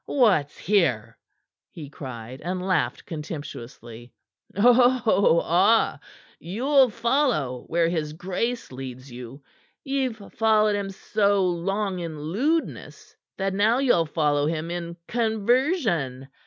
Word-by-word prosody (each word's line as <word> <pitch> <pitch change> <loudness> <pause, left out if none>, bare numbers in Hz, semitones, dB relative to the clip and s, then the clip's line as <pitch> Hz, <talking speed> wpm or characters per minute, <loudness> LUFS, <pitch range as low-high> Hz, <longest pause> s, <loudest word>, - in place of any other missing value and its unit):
"What's 195 - +2
here?" 170 - +1 0.5
he 155 -4 -9
cried, 130 -2 -8
and 180 +3 -3
laughed 145 -9 0
contemptuously. 125 -7 -8 0.5
"Oh, 240 -6 +4
ah! 195 +7 +3 0.4
You'll 260 - +2
follow 235 - 0
where 170 0 +1
his 155 -3 -2
grace 210 - -3
leads 130 0 -8
you! 125 +3 -10 0.4
Ye've 270 -4 -1 0.2
followed 215 -1 +3
him 200 -1 -3
so 200 0 +1
long 190 +2 -1
in 165 -3 -6
lewdness 255 - -3 0.2
that 195 0 -1
now 215 +5 +3
yell 245 - +2
follow 150 -2 +1
him 165 +1 -3
in 170 -1 -5
conversion! 220 - 0
180 Hz, 110 wpm, -24 LUFS, 150-225 Hz, 0.5 s, Oh